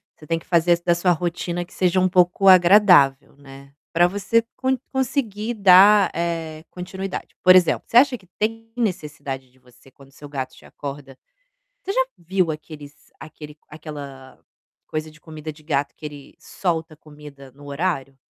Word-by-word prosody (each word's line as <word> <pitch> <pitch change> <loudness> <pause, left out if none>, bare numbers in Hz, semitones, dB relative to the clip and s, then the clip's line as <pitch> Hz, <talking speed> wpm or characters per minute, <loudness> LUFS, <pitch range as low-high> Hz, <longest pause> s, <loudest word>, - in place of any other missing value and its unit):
Você 155 - -16
tem 165 +2 -1
que - - -21
fazer 170 0 +2
da 175 - +3
sua 180 +1 +1
rotina 175 +1 -3
que 175 - -21
seja 185 0 +1
um 185 - +3
pouco 180 +1 +2
agradável, 180 -7 +5
né. 140 0 -15 0.2
Para 175 +1 +4
você 205 +5 0
con 260 0 0
conseguir 240 -4 -2
dar, 200 0 +6
eh, 165 -2 -4
continuidade. 190 +1 -7
Por 185 0 +7
exemplo, 180 -2 +3
você 230 - +2
acha 260 0 +5
que 190 -4 -24
tem 225 +1 -3
necessidade 150 - -4
de 130 - -30
você 125 +1 -22
quando 135 +1 -19
seu 145 +2 -13
gato 135 -2 -5
te - - -18
acorda, 140 -2 -9 0.6
você 390 - -4
já 260 -9 +1
viu 180 0 -1
aqueles 150 -1 -11
aquele 155 -1 -12
aquela 145 -4 -10 0.5
coisa 155 0 -5
de 155 - -20
comida 155 -1 -9
de 155 +1 -17
gato 145 -2 -1
que - - -12
ele 145 -2 -10
solta 165 -3 -3
comida 145 -3 -14
no 145 +3 -16
horário? 140 -3 -3
165 Hz, 165 wpm, -22 LUFS, 145-185 Hz, 0.6 s, Por